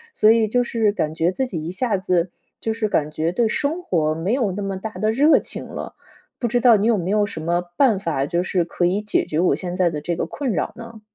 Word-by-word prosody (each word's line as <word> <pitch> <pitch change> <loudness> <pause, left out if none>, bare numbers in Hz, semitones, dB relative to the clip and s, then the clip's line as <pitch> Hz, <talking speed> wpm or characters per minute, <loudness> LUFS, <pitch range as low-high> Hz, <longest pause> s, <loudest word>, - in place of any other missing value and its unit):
所 215 - +5
以 225 -1 +3
就 245 +3 +2
是 225 -3 +1
感 155 -7 -2
觉 165 +2 +1
自 265 +8 -1
己 175 -11 -5
一 170 - -3
下 205 +2 0
子 180 -2 0 0.3
就 225 - -2
是 220 -1 -1
感 150 -5 0
觉 160 +2 -1
对 230 +5 +1
生 295 +9 -1
活， 155 - 0
没 170 +7 -1
有 240 -7 +1
那 205 - -4
么 195 -1 -3
大 220 +4 -5
的 215 +3 0
热 290 +7 +5
情 - - -6
了， - - -7 0.5
不 240 - 0
知 245 +2 +1
道 240 -1 +6
你 205 +2 +1
有 230 -2 +3
没 180 -1 -3
有 210 0 +3
什 200 - -7
么 170 +2 0 0.2
办 240 -8 +4
法， 155 -7 -1
就 170 +4 0
是 180 -1 0
可 175 +1 -1
以 190 +4 0
解 210 - +1
决 155 - -2
我 180 - +3
现 180 -1 -5
在 180 -2 +2
的 150 -2 -4
这 170 +2 -2
个 - - -2
困 275 -4 -3
扰 - - -2
呢？ 230 -2 -11
200 Hz, 285 characters per minute, -22 LUFS, 175-230 Hz, 0.5 s, 道